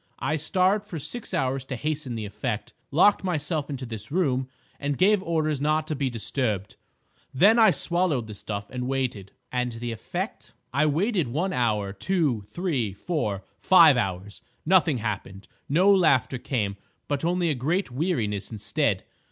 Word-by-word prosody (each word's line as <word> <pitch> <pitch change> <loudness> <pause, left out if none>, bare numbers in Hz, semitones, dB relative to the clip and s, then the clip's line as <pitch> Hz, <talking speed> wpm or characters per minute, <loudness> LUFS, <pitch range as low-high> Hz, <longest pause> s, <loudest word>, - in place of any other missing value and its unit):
I 155 - -1
starved 185 +6 +2
for 185 -5 -7
six 160 - -7
hours 130 0 0
to 130 - -4
hasten 150 -2 -3
the 110 -2 -4
effect, 105 +1 -4 0.2
locked 190 +9 +4
myself 155 -4 -2
into 135 -2 -4
this 110 -1 -7
room, 135 -7 +1 0.3
and 140 -1 -2
gave 205 +1 +4
orders 155 -5 0
not 155 +1 +1
to 155 - -2
be 135 -1 -1
disturbed. 110 -3 -2 0.6
Then 205 - +6
I 220 -2 +8
swallowed 170 -8 +1
the 110 - -8
stuff 100 0 -5
and 125 -1 -3
waited." 125 -8 -2 0.2
"And 125 -1 -1
the 120 +1 -4
effect?" 115 - -5 0.2
"I 145 +3 +3
waited 175 - +1
one 170 +10 -1
hour, 105 -5 0
two, 140 - 0
three, 130 - -2
four, 105 - -2 0.2
five 170 -6 +7
hours. 100 -3 -3 0.2
Nothing 165 -5 +4
happened. 100 -3 -5 0.2
No 185 +8 +5
laughter 140 - +3
came, 105 -7 -2 0.3
but 145 0 -2
only 175 0 +1
a - - +2
great 150 +6 -1
weariness 120 - -1
instead. 110 0 0
140 Hz, 160 wpm, -26 LUFS, 115-170 Hz, 0.6 s, I